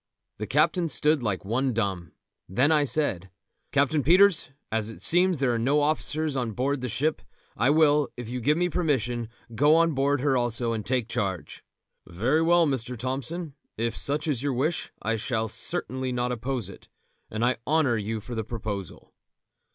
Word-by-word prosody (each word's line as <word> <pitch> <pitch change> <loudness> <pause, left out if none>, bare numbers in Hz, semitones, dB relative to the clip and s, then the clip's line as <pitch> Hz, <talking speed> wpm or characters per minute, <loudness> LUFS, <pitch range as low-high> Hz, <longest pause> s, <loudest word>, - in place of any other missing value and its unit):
The 105 - -4
captain 165 +4 +2
stood 150 -1 +2
like 105 -5 -2
one 125 +5 0
dumb; 95 -7 -2 0.4
then 125 - +2
I 150 -2 +4
said: 95 - 0 0.4
"Captain 145 +2 +2
Peters, 180 +3 +4 0.2
as 110 -1 -1
it 115 - -9
seems 180 0 +4
that 135 - 0
there 125 - +2
are 115 - -1
no 135 +6 +2
officers 155 0 0
on 120 -4 -2
board 135 +4 -1
the 125 - -3
ship, 150 +8 0 0.3
I 120 +5 +2
will, 150 -2 +4
if 120 -2 -6
you 125 +2 -4
will 115 - -9
give 150 +2 +3
me 180 +1 +2
permission, 125 - -1 0.2
go 145 +7 +4
on 165 -1 +3
board 140 0 +1
her 140 -1 +2
also 120 -1 0
and 110 -2 -3
take 125 -1 -1
charge." 95 -6 -4 0.4
"Very 120 - +1
well, 170 +1 +4
Mr. 125 -4 -2
Thompson; 135 +6 -3 0.2
if 115 +1 -1
such 145 +2 -1
is 140 -6 0
your 140 -1 -1
wish 145 +6 -1
I 115 +1 0
shall 110 +1 -2
certainly 130 +3 -3
not 125 0 -1
oppose 125 -2 -3
it, 95 - -13 0.4
and 110 +2 -1
I 125 - +1
honour 150 -6 +2
you 110 +1 -3
for 120 +3 -7
the 110 -1 -2
proposal." 105 -5 -6
130 Hz, 185 wpm, -26 LUFS, 115-150 Hz, 0.4 s, I